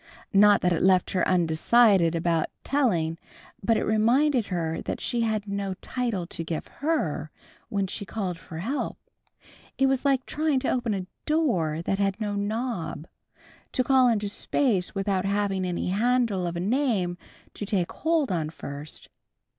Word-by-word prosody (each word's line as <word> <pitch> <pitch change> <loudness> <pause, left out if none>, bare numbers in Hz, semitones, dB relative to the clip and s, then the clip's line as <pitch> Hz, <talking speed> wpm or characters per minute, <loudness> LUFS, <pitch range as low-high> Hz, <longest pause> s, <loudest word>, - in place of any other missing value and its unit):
Not 205 +1 +6
that 180 0 +2
it 165 - -1
left 185 -1 +3
her 185 - +1
undecided 180 +1 +4
about 165 -1 +1 0.2
telling, 170 - +1 0.4
but 225 +2 +3
it - - 0
reminded 240 +3 +3
her 165 -3 -2
that - - -4
she 240 - -1
had 215 -2 -1
no 200 -1 -3
title 235 -5 -3
to 170 -1 -5
give 160 -1 -4 0.2
"Her," 180 - 0 0.4
when 200 -2 0
she 195 +2 -5
called 190 -4 -4
for 160 - -9
help. 240 - -3 0.8
It 270 - +3
was 270 -1 +1
like 270 -2 +2
trying 305 -3 0
to - - 0
open 240 -4 0
a 185 -2 -4 0.2
door 185 - +1
that 195 +3 -1
had 195 0 0
no 210 -2 -2
knob, 205 - -3 0.7
to 255 - +2
call 260 0 +5
into 210 -3 +1
space 205 -2 0
without 195 -1 0
having 200 -1 0
any 180 0 -2
handle 220 -2 +1
of 170 - -4
a - - -2
name 200 -6 0 0.3
to - - -6
take 195 -4 0
hold 320 -5 0
of 160 -4 -1
first. 145 -1 -6
200 Hz, 160 wpm, -26 LUFS, 175-245 Hz, 0.8 s, Not